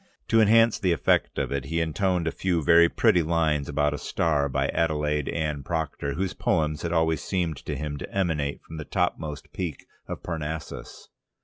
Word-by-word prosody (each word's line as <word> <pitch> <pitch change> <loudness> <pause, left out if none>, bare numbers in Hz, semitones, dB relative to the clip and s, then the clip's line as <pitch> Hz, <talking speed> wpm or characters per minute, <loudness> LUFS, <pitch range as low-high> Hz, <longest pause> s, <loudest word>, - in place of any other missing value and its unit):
To 115 -1 +5
enhance 115 +1 +5
the 90 -3 +2
effect 85 - +1
of - - -1
it 70 -2 -2
he 85 +4 -1
intoned 85 +2 0
a 80 - 0
few 90 -4 -1
very 85 +1 +6
pretty 90 - +3
lines 80 -3 0
about 75 0 +1
a 75 - -4
star 75 -3 0
by - - 0
Adelaide 75 -3 0
Anne 75 -3 -2
Procter, 75 -2 -3
whose 95 +1 -2
poems 75 0 0
had 85 - -3
always 80 -1 +1
seemed 85 -6 -1
to - - -5
him 75 -1 -4
to - - -7
emanate 80 -7 -1
from 80 - -9
the 80 - -5
topmost 80 -5 -2
peak 85 -6 -4 0.2
of - - -6
Parnassus. 80 -2 -6
80 Hz, 185 wpm, -26 LUFS, 75-85 Hz, 0.2 s, very